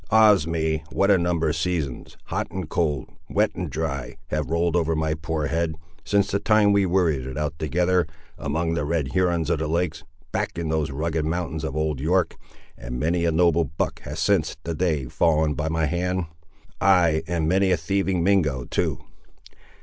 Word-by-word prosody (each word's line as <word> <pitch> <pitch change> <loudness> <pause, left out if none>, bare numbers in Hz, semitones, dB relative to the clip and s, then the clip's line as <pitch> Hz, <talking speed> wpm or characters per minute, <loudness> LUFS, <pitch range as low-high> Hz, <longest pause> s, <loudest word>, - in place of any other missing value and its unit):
Ah's 105 -7 +5
me! 80 -1 -1
what 100 +1 +3
a 100 - +6
number 85 -2 +1
of 75 - -1
seasons, 80 -5 -3
hot - - -3
and - - -5
cold, 75 -6 -1 0.2
wet - - +2
and 90 -3 -4
dry, 70 -4 -3
have 75 -1 -2
rolled 85 +1 +1
over 80 -2 +1
my 80 0 0
poor 80 -1 -2
head, 80 +1 -1 0.3
since 100 +4 +1
the 100 - +1
time 110 -1 +4
we 100 -1 +3
worried 85 -8 +1
it 65 +1 -6
out 75 +1 -3
together, 90 +4 +1 0.3
among 80 +4 -1
the 80 - -1
Red 75 -2 -1
Hurons 85 -3 +1
of - - +1
the 80 - -1
Lakes, 80 -1 -1 0.3
back - - -2
in 85 -2 -2
those 80 -2 0
rugged 80 +3 -1
mountains 80 -1 -2
of 75 -3 -3
Old 75 -3 -1
York! 90 +5 +1 0.4
and - - -6
many 85 +4 +1
a 85 - +2
noble 85 0 +3
buck 75 +3 -3
has - - -7
since - - +1
that 85 -1 -4
day 80 -7 +1
fallen 75 +3 +2
by 75 +2 -2
my 80 -1 +1
hand; 90 +3 -1 0.6
ay, 85 -5 +4
and 80 -2 0
many 95 +3 +3
a 90 - +3
thieving 95 +1 0
Mingo, 75 -10 +2
too! - - -1
80 Hz, 190 wpm, -24 LUFS, 75-90 Hz, 0.6 s, a